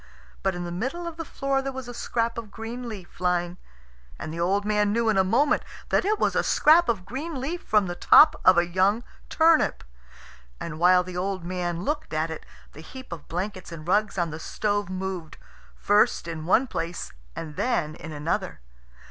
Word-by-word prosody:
But 195 Hz, -1 st, 0 dB
in 175 Hz, -, -4 dB
the 175 Hz, -, -5 dB
middle 260 Hz, -, -3 dB
of 335 Hz, -1 st, -6 dB
the 330 Hz, -, -4 dB
floor 275 Hz, -2 st, -1 dB
there 270 Hz, 0 st, -3 dB
was 265 Hz, -2 st, -7 dB
a 245 Hz, -, -7 dB
scrap 235 Hz, 0 st, -2 dB
of 225 Hz, -2 st, -9 dB
green 235 Hz, +3 st, -6 dB
leaf 195 Hz, -5 st, -10 dB
lying, 180 Hz, 0 st, 0 dB, 0.6 s
and 155 Hz, -, -6 dB
the 165 Hz, -, -5 dB
old 195 Hz, +4 st, +1 dB
man 210 Hz, -1 st, +2 dB
knew 230 Hz, +1 st, +1 dB
in 215 Hz, -, +2 dB
a -, -, +5 dB
moment 280 Hz, +11 st, +2 dB, 0.3 s
that -, -, +2 dB
it 425 Hz, +2 st, +2 dB
was -, -, +1 dB
a -, -, +3 dB
scrap 335 Hz, +3 st, +5 dB
of 200 Hz, -6 st, -1 dB
green 275 Hz, -, -5 dB
leaf 320 Hz, +7 st, -3 dB
from 210 Hz, -2 st, +2 dB
the 175 Hz, -, -3 dB
top 305 Hz, -, +7 dB
of 185 Hz, -, +6 dB
a 175 Hz, -, +4 dB
young 190 Hz, +6 st, +2 dB, 0.3 s
turnip. 325 Hz, 0 st, +3 dB, 0.8 s
And 155 Hz, -2 st, -6 dB
while 180 Hz, +1 st, +5 dB
the 180 Hz, 0 st, -7 dB
old 190 Hz, 0 st, -2 dB
man 175 Hz, -1 st, -3 dB
looked 295 Hz, -, -3 dB
at 160 Hz, +1 st, 0 dB
it, 160 Hz, -, -8 dB, 0.3 s
the 155 Hz, -, -11 dB
heap 260 Hz, +9 st, -11 dB
of 165 Hz, -4 st, -8 dB
blankets 185 Hz, +1 st, -4 dB
and 165 Hz, -1 st, -9 dB
rugs 205 Hz, +2 st, +1 dB
on 170 Hz, -2 st, 0 dB
the 155 Hz, -, -6 dB
stove 205 Hz, +3 st, -1 dB
moved, 185 Hz, -3 st, -5 dB, 0.4 s
first 205 Hz, -4 st, +2 dB
in 160 Hz, -1 st, -5 dB
one 235 Hz, +8 st, +4 dB
place 170 Hz, -8 st, -4 dB, 0.2 s
and 155 Hz, -2 st, -6 dB
then 170 Hz, -, 0 dB
in 160 Hz, 0 st, -9 dB
another. 145 Hz, -, -2 dB
195 Hz, 200 wpm, -26 LUFS, 175-245 Hz, 0.8 s, top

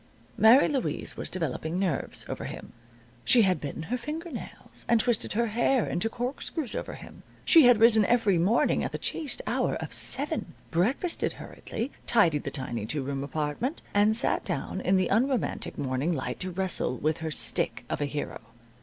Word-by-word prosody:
Mary 235 Hz, +6 st, +6 dB
Louise 270 Hz, -5 st, -2 dB
was -, -, -4 dB
developing 160 Hz, -1 st, -3 dB
nerves 185 Hz, -3 st, -2 dB
over -, -, -5 dB
him. -, -, -8 dB, 0.5 s
She 240 Hz, -3 st, +5 dB
had 185 Hz, -2 st, +1 dB
bitten 145 Hz, +2 st, -5 dB
her 245 Hz, +9 st, -3 dB
finger 320 Hz, +6 st, -6 dB
nails, 250 Hz, -, -8 dB
and 235 Hz, -, +5 dB
twisted 240 Hz, -1 st, 0 dB
her 235 Hz, +3 st, +1 dB
hair 235 Hz, +2 st, +1 dB
into 215 Hz, +6 st, -1 dB
corkscrews 250 Hz, +3 st, -4 dB
over -, -, -5 dB
him. -, -, -12 dB, 0.2 s
She 325 Hz, -5 st, +7 dB
had 245 Hz, -2 st, +7 dB
risen 225 Hz, -1 st, +5 dB
every 215 Hz, -7 st, +3 dB
morning 200 Hz, +8 st, +2 dB
at -, -, -4 dB
the -, -, -2 dB
chaste 305 Hz, -4 st, -2 dB
hour -, -, 0 dB
of -, -, -5 dB
seven, -, -, 0 dB, 0.2 s
breakfasted 245 Hz, -, 0 dB
hurriedly, 235 Hz, +6 st, -6 dB, 0.2 s
tidied 170 Hz, -11 st, +3 dB
the -, -, -1 dB
tiny 120 Hz, -5 st, -1 dB
two 145 Hz, +1 st, -1 dB
room 135 Hz, 0 st, -3 dB
apartment, 150 Hz, -, -3 dB
and 210 Hz, +2 st, +4 dB
sat 235 Hz, -, +1 dB
down -, -, -3 dB
in 190 Hz, -, +2 dB
the 185 Hz, -, +1 dB
unromantic 250 Hz, +5 st, 0 dB
morning 135 Hz, +4 st, -1 dB
light 130 Hz, -4 st, -4 dB
to 185 Hz, -, -2 dB
wrestle 185 Hz, -8 st, -1 dB
with 155 Hz, +4 st, -1 dB
her 160 Hz, 0 st, -3 dB
stick 155 Hz, -, -1 dB
of -, -, -3 dB
a -, -, +1 dB
hero. 145 Hz, +1 st, -5 dB
205 Hz, 180 wpm, -27 LUFS, 155-245 Hz, 0.5 s, She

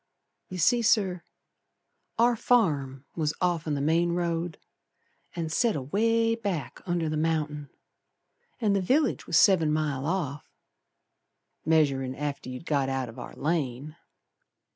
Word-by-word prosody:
You 185 Hz, -, -6 dB
see, 235 Hz, +8 st, +3 dB
Sir, 200 Hz, -6 st, +2 dB, 1.0 s
Our 235 Hz, +1 st, +4 dB
farm 145 Hz, -, +1 dB
was 155 Hz, -2 st, -1 dB
off'n 165 Hz, -4 st, 0 dB
the 140 Hz, -, -2 dB
main 165 Hz, +3 st, +2 dB
road, 170 Hz, -1 st, -2 dB, 0.8 s
And 165 Hz, -2 st, -3 dB
set 230 Hz, +6 st, +2 dB
away 225 Hz, -, +1 dB
back 200 Hz, -, -4 dB
under 175 Hz, -2 st, 0 dB
the 155 Hz, 0 st, -1 dB
mountain; 150 Hz, -2 st, -1 dB, 0.9 s
And 210 Hz, -4 st, +2 dB
the 195 Hz, -, +1 dB
village 265 Hz, -, +1 dB
was 165 Hz, -, +2 dB
seven 170 Hz, -7 st, +5 dB
mile 150 Hz, -3 st, -1 dB
off, 155 Hz, -6 st, -3 dB, 1.2 s
Measurin' 135 Hz, -5 st, +2 dB
after 145 Hz, -3 st, -4 dB
you'd 125 Hz, +5 st, -7 dB
got 140 Hz, -3 st, +1 dB
out 135 Hz, -2 st, -2 dB
o' -, -, -8 dB
our -, -, -9 dB
lane. 150 Hz, -1 st, -2 dB
160 Hz, 130 wpm, -27 LUFS, 145-190 Hz, 1.2 s, seven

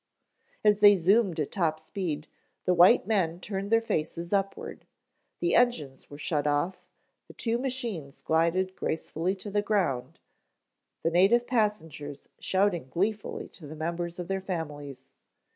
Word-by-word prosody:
As 210 Hz, -1 st, +4 dB
they 205 Hz, -1 st, +8 dB
zoomed 190 Hz, -1 st, +3 dB
at 150 Hz, -, -1 dB
top 160 Hz, -4 st, 0 dB
speed, 160 Hz, -3 st, -4 dB, 0.4 s
the 180 Hz, -, +3 dB
white 175 Hz, +1 st, +6 dB
men 180 Hz, -6 st, +1 dB
turned 195 Hz, +1 st, -4 dB
their 225 Hz, +1 st, +4 dB
faces 170 Hz, -2 st, -2 dB
upward. 195 Hz, -1 st, -2 dB, 0.5 s
The 345 Hz, -, +1 dB
engines 155 Hz, -, +1 dB
were 145 Hz, -, -9 dB
shut 150 Hz, -1 st, -1 dB
off, 145 Hz, +6 st, -1 dB, 0.4 s
the -, -, -13 dB
two 230 Hz, 0 st, -1 dB
machines 235 Hz, -, -4 dB
glided 170 Hz, +4 st, +1 dB
gracefully 165 Hz, +3 st, -2 dB
to 200 Hz, +2 st, -8 dB
the 205 Hz, +1 st, +2 dB
ground, 185 Hz, -12 st, -1 dB, 0.8 s
the 165 Hz, -, +1 dB
native 200 Hz, +8 st, +4 dB
passengers 165 Hz, -, -2 dB
shouting 190 Hz, -7 st, +1 dB
gleefully 205 Hz, +8 st, -2 dB
to 155 Hz, -, -12 dB
the 155 Hz, -, -8 dB
members 170 Hz, +2 st, -3 dB
of 175 Hz, -1 st, -5 dB
their 195 Hz, 0 st, -2 dB
families. 145 Hz, -7 st, -6 dB
180 Hz, 145 wpm, -28 LUFS, 155-205 Hz, 0.8 s, they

